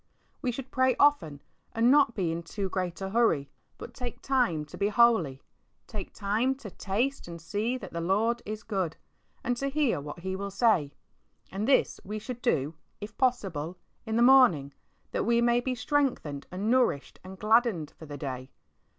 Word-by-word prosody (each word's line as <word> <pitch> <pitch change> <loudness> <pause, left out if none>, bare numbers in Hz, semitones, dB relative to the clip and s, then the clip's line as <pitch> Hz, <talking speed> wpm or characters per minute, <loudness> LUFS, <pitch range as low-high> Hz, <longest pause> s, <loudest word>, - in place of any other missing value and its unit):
We 250 - 0
should 260 +2 -7
pray 260 0 +3
often 170 - +3 0.3
and 230 +2 +4
not 280 -5 +4
be 180 -5 0
in 165 +1 -3
too 190 +4 -4
great 180 -2 -3
a 190 0 -3
hurry, 195 -12 +2 0.3
but - - -9
"take 245 -2 -6
time 240 - +1
to - - -11
be 200 0 0
holy;^' 210 - +3 0.4
take - - -7
time 220 +6 0
to 230 -7 -10
"taste 230 +9 -2
and 170 -1 -8
see 210 +9 -2
that - - -10
the 170 - -3
Lord 220 +7 +1
is 215 +1 -6
good," 190 -8 -2 0.5
and 245 - 0
to 275 - -1
hear 280 - +1
what 150 +4 -8
He 190 +1 -3
will 200 +1 -4
say. 195 - +2 0.6
And 200 +4 -2
this 275 - +3
we 210 +2 -5
should 240 +3 -7
do, 145 -4 +1 0.3
if 210 +1 -8
possible, 185 - -1 0.3
in 220 -1 -3
the 235 - +4
morning, 240 - +5 0.4
that - - -1
we 235 +2 +3
may 240 0 +3
be 255 +1 -2
strengthened 245 - -1
and 200 +5 -1
nourished 245 - +1
and 190 +1 -10
gladdened 215 -7 +2
for 160 - -10
the 145 0 -7
day. 130 -2 -5
210 Hz, 185 wpm, -28 LUFS, 170-245 Hz, 0.6 s, morning